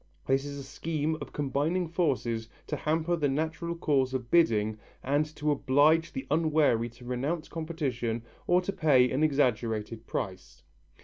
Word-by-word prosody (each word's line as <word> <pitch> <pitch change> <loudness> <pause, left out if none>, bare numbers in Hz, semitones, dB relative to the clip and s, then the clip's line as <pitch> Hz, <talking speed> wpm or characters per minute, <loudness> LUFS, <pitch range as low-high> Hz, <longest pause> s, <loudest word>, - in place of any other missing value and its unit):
This 135 +1 +1
is 140 0 -6
a 140 - -6
scheme 155 +2 -2
of - - -7
combined 155 +5 -1
forces 120 -9 0 0.2
to 150 - -3
hamper 160 +3 0
the 150 -4 +1
natural 160 +4 -2
course 135 -5 +1
of 125 -2 -4
bidding 110 -10 +3 0.2
and 145 +3 +1
to 150 0 0
oblige 150 +4 +3
the 135 - -5
unwary 150 -7 +2
to 120 +1 -15
renounce 135 +7 -2
competition 135 -9 -3 0.2
or 180 +1 +4
to 195 +2 -3
pay 135 -8 +4
an 130 - 0
exaggerated 115 -6 0
price. 95 -4 -5
145 Hz, 150 wpm, -29 LUFS, 125-160 Hz, 0.2 s, or